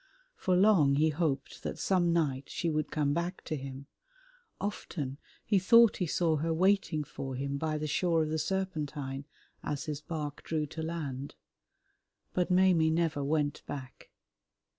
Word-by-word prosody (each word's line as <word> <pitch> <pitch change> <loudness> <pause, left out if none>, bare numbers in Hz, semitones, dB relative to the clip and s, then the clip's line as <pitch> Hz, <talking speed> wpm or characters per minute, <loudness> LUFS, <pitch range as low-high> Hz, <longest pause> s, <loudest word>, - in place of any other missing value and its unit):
For 185 - +1
long 180 -8 +5
he 155 +2 +4
hoped 145 -3 -2
that - - -4
some 180 -3 +2
night 140 -5 +1
she 170 - -1
would 155 0 -1
come 145 -2 +1
back 175 +4 -2
to 155 - -3
him; 135 -1 -7 0.7
often 150 -9 -4 0.3
he 205 -3 +3
thought 230 +4 +6
he 180 - -1
saw 160 0 +2
her 165 +3 -1
waiting 180 -2 +2
for 135 -2 -6
him 140 +2 -2
by 155 0 -1
the 155 - -3
shore 165 +2 +2
of 155 - -3
the 160 0 -1
Serpentine 150 -6 -3 0.4
as 145 -2 -3
his 150 -1 -4
bark 150 -2 -5
drew 155 -2 -1
to 160 +2 -7
land, 145 -5 -4 1.0
but 180 -1 +1
Maimie 180 -3 +4
never 160 -3 +1
went 145 0 0
back. 130 -3 -8
155 Hz, 160 wpm, -31 LUFS, 145-175 Hz, 1.0 s, thought